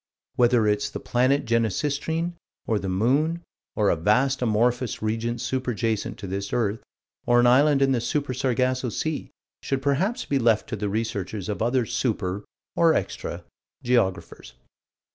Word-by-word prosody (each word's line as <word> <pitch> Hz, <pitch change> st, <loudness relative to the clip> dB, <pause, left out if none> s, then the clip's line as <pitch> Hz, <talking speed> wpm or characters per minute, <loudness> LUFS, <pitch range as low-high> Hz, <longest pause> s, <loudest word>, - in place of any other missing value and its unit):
Whether 120 Hz, -3 st, +4 dB
it's 105 Hz, 0 st, +1 dB
the -, -, -6 dB
planet 130 Hz, +3 st, +1 dB
Genesistrine, 145 Hz, -, 0 dB, 0.3 s
or 110 Hz, -2 st, 0 dB
the 95 Hz, -, -4 dB
moon, 140 Hz, -, +1 dB, 0.3 s
or 105 Hz, -2 st, +3 dB
a -, -, +2 dB
vast 125 Hz, +11 st, +2 dB
amorphous 120 Hz, +1 st, 0 dB
region 115 Hz, +2 st, -1 dB
super 130 Hz, 0 st, -2 dB
jacent 110 Hz, -2 st, -2 dB
to 100 Hz, -, -8 dB
this 100 Hz, +1 st, -4 dB
earth, 110 Hz, -2 st, 0 dB, 0.5 s
or 120 Hz, 0 st, +5 dB
an 120 Hz, -, +4 dB
island 140 Hz, +3 st, +5 dB
in 135 Hz, -, +3 dB
the 125 Hz, -3 st, +1 dB
Super 140 Hz, +2 st, -1 dB
Sargasso 130 Hz, 0 st, 0 dB
Sea, 155 Hz, +7 st, -3 dB, 0.3 s
should 135 Hz, -1 st, -2 dB
perhaps 175 Hz, -, 0 dB
be 140 Hz, -, 0 dB
left 115 Hz, -3 st, +2 dB
to -, -, -2 dB
the 105 Hz, -1 st, -3 dB
researches 105 Hz, -2 st, -3 dB
of 105 Hz, -, -3 dB
other 120 Hz, +1 st, +1 dB
super 105 Hz, -5 st, -2 dB, 0.3 s
or 165 Hz, -2 st, +4 dB
extra -, -, -3 dB, 0.4 s
geographers. 95 Hz, -, -1 dB
120 Hz, 155 wpm, -25 LUFS, 110-135 Hz, 0.5 s, or